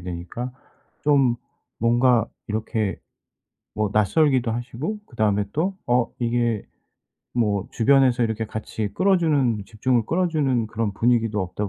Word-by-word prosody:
되니까 90 +8 -5 0.5
좀 135 -5 +3 0.4
뭔가 120 0 +3 0.2
이렇게 110 -1 -2 0.8
뭐 105 -2 0
낯설기도 125 +4 +3
하시고 120 - -4
그다음에 105 -4 +1
또 185 +5 -1
어 120 0 +2
이게 120 -2 0 0.7
뭐 105 -5 +1
주변에서 125 0 +3
이렇게 110 0 -2
같이 110 0 -4
끌어주는 150 - +2
집중을 115 +2 0
끌어주는 155 -9 +1
그런 110 -2 -2
분위기도 115 -1 +1
없다 95 +3 -3
115 Hz, 275 characters per minute, -23 LUFS, 105-130 Hz, 0.8 s, 좀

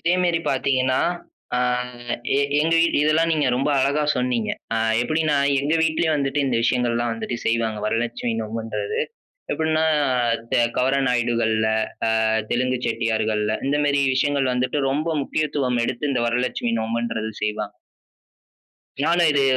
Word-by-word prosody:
இதே 175 +2 +2
மேரி 170 -2 +2
பாத்தீங்கன்னா, 130 -1 +1 0.6
ஆ - - +1 0.8
எ - - +3 0.2
எங்க 165 +2 +1
வீட் 165 - +2
இதெல்லாம் 160 +2 +2
நீங்க 150 -3 +1
ரொம்ப 135 +3 0
அழகா 140 +3 +1
சொன்னீங்க. 125 -3 0 0.2
ஆ - - +1 0.3
எப்டீன்னா, 155 +2 +1 0.2
எங்க 150 +3 0
வீட்டிலயும் 160 -1 +1
வந்துட்டு 140 +1 0
இந்த 125 -3 0
விஷயங்கள்லாம் 120 -1 +1
வந்துட்டு 115 +1 -4
செய்வாங்க. 115 -2 0
வரலட்சுமி 115 +1 -1
நோம்புன்றது. 110 -1 -3 0.5
எப்புட்ன்னா 160 0 +1 0.7
த - - +2 0.2
கவர 130 +2 +2
நாயுடுகள்ல, 115 -3 +1 0.6
ஆ - - +2 0.2
தெலுங்கு 125 +1 +1
செட்டியார்கள்ல 110 -2 0
இந்த 145 - +1
மேரி 140 -1 +2
விஷயங்கள் 140 -1 +1
வந்துட்டு 130 +4 0
ரொம்ப 150 +4 -1
முக்கியத்துவம் 140 -4 -1
எடுத்து 130 +3 -2
இந்த 125 - 0
வரலட்சுமி 120 0 -1
நோம்புன்றது 110 -1 -2
செய்வாங்க. 105 -1 -2 1.3
நானும் 170 +3 +3
இது, 140 -1 +2
125 Hz, 130 wpm, -22 LUFS, 115-145 Hz, 1.3 s, எ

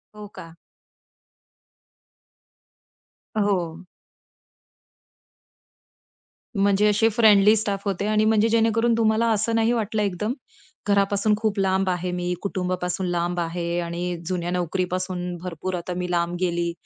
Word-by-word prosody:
हो 210 0 -9
का? 165 0 -11 2.8
अ, - - +1
हो. 180 -3 -1 2.7
म्हणजे 200 +1 +3
असे 215 +2 +3
फ्रेंडली 215 -2 +5
स्टाफ 200 -2 -2
होते 200 0 -1
आणि 215 0 +2
म्हणजे 220 0 +3
जेणेकरून 230 +1 +2
तुम्हाला 225 0 +2
असं 220 +2 0
नाही 225 +1 +2
वाटलं 220 -2 -1
एकदम, 205 +3 -1 0.5
घरापासून 200 +1 +2
खूप 215 -2 -1
लांब 190 0 +1
आहे 180 0 -2
मी, 180 0 -2
कुटुंबापासून 185 -1 -2
लांब 175 0 -1
आहे 170 0 -2
आणि 175 +1 -3
जुन्या 175 -1 -2
नोकरीपासून 180 0 -2
भरपूर 180 +1 -4
आता 180 +1 -4
मी 180 0 -3
लांब 170 0 0
गेली. 175 -1 0
190 Hz, 120 wpm, -24 LUFS, 175-210 Hz, 2.8 s, फ्रेंडली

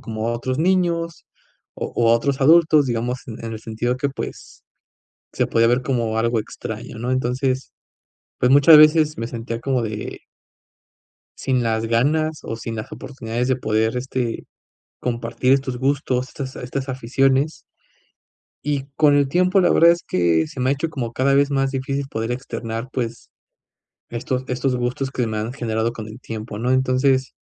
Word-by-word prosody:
como 110 -3 -4
a 120 - 0
otros 130 +3 -3
niños, 170 -1 0 0.5
o - - -4
o 115 -1 +4
a 115 - +6
otros 135 +3 0
adultos, 155 0 +6
digamos, 120 +1 -2
en 115 -2 -8
en 115 - -4
el 110 - -7
sentido 115 +3 -2
que, 140 +2 -1
pues, 135 - -8 0.7
se - - 0
podía 115 0 +3
ver 120 +2 +2
como 115 -4 -1
algo 115 0 +1
extraño, 110 - -7
¿no? 120 +2 -3
Entonces, 130 +1 -1 0.7
pues, 125 - +3
muchas 145 +3 +8
veces 155 0 +5
me 115 - -3
sentía 115 0 -5
como 130 -1 0
de 105 -2 -5 1.2
sin 130 -2 0
las 110 -1 0
ganas, 150 +7 +1
o 115 - -4
sin 115 0 -5
las 110 - -6
oportunidades 120 -2 -4
de 130 - +2
poder, 110 -1 0
este, 125 -2 -3 0.5
compartir 120 +1 0
estos 130 -2 -2
gustos, 130 -1 0
estas 135 -2 -7
estas 130 +2 -4
aficiones 135 +4 +1 1.0
y 145 -2 -1
con 150 -2 +5
el 140 -1 +3
tiempo, 185 +6 +3
la 180 - +3
verdad, 170 +1 +6
es 170 - -4
que 85 -3 +2
se 130 - -8
me 130 +1 +2
ha - - +4
hecho 150 +3 -2
como 125 -7 -4
cada 135 +3 +2
vez 140 +1 +3
más 135 -1 +1
difícil, 135 +1 -2
poder 115 -1 -3
externar, 115 -2 -5
pues, 115 -2 -4 0.8
estos 125 +2 -3
estos 125 +1 0
gustos, 125 +2 -2
que 125 -4 -1
me 110 -1 -3
han 110 +3 -3
generado 115 -3 -1
con 110 -2 -7
el 110 +3 -10
tiempo, 110 -3 -7
¿no? 125 +2 0
Entonces, 130 0 +2
130 Hz, 175 wpm, -21 LUFS, 115-140 Hz, 1.2 s, muchas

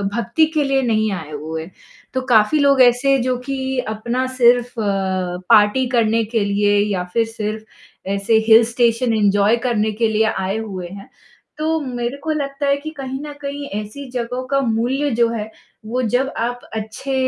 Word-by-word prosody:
भक्ति 235 +6 +2
के 305 - +2
लिए 275 -1 +1
नहीं 220 -3 +1
आए 160 -5 -6
हुए, 160 +2 -5 0.5
तो 260 - -1
काफ़ी 225 +6 +4
लोग 280 -2 +4
ऐसे 255 +3 +4
जो 255 -1 0
कि 275 0 -3 0.3
अपना 235 +4 -2
सिर्फ़ 245 0 +3
लगता 190 -3 -1
है 180 - -4
पार्टी 220 +3 +5
करने 230 -2 +2
के 225 -3 +2
लिए 205 0 +2 0.2
या 180 -2 -1
फ़िर 230 -1 +2
सिर्फ़ 215 -3 -8
ऐसे 200 +3 +2
हिल 225 0 +8
स्टेशन 235 0 +1
एन्जॉय 205 +1 +3
करने 220 -2 +1
के 225 - +4
लिए 220 0 +2
आए 190 +2 -2
हुए 195 -5 -5
हैं। 195 +3 -11 0.5
तो 320 +1 0
मेरे 245 0 -4
को 315 - -1
लगता 280 -1 -2
है 280 - +4
कि 305 +2 -7
कहीं 265 -1 -5
न 295 - -7
कहीं 285 0 -5 0.2
ऐसी 255 +6 -9
जगहों 250 +1 -3
का 275 +1 +1
मूल्य 250 +4 0
जो 235 0 +3
है, 220 -2 -4 0.4
वो 245 +4 -2
जब 250 +4 0
आप 245 +1 -2
अच्छे 220 +5 -5
235 Hz, 180 wpm, -19 LUFS, 210-260 Hz, 0.5 s, हिल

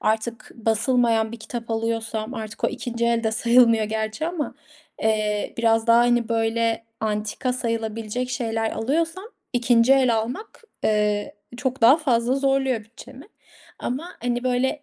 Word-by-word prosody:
artık 220 +2 -2
basılmayan 225 0 +1
bir 235 - -5
kitap 235 -1 -7
alıyorsam 225 +1 -2
artık 220 -1 -6
o - - +4
2'nci 235 -1 -3
el 235 0 +1
de 220 - +2
sayılmıyor 230 -1 +4
gerçi 220 +6 -2
ama, 335 -4 -3 0.5
eee, 215 -1 0
biraz 225 0 +2
daha, 230 0 +6
hani, 240 -1 +3
böyle 230 0 0 0.2
antika 215 +3 -2
sayılabilecek 230 0 -3
şeyler 225 -3 -1
alıyorsam 330 - -1 0.3
2'nci 240 0 +4
el 260 -3 +4
almak, 250 - -5 0.2
eee, 210 -1 +1 0.2
çok 260 +1 -2
daha 240 +5 +7
fazla 250 -5 +1
zorluyor 270 -4 +1
bütçemi. 255 - -13 0.5
Ama, 275 +8 -4
hani, 245 0 -1
böyle 255 +3 0
230 Hz, 140 wpm, -23 LUFS, 220-255 Hz, 0.5 s, daha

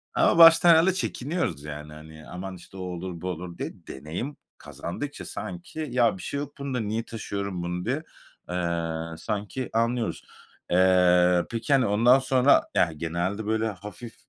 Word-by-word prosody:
A - - +3
ama - - +4
baştan 165 +1 +9
herhâlde 170 +3 +6
çekiniyoruz, 145 - -2
yani, 75 0 -8
hani, 80 0 -12
"Aman, 95 +1 -6
işte, 95 +2 -14
o - - -6
olur, 90 -1 -5
bu 90 - -3
olur." 90 0 -6
diye. - - -4 0.2
Deneyim 85 - -6 0.2
kazandıkça 145 +12 -6
sanki, 175 -3 -6
"Ya, 120 -5 +3
bir - - -10
şey 140 - -3
yok 145 0 -7
bunda. 135 -3 -2
Niye 110 +2 -2
taşıyorum 100 -5 -4
bunu?" 90 +1 -3
diye, 140 +7 -1 0.5
eee, 85 -2 -2
sanki 105 +5 -4
anlıyoruz. 115 0 0 0.5
Eee, 90 -1 +4
peki, 115 +5 -1
hani, 130 -3 +4
ondan 120 +6 +5
sonra 130 +1 +4
Yani, 85 -3 +2
genelde, 85 +6 -2
böyle, 110 +1 0
hafif 105 +3 -8
100 Hz, 160 wpm, -26 LUFS, 85-130 Hz, 0.5 s, baştan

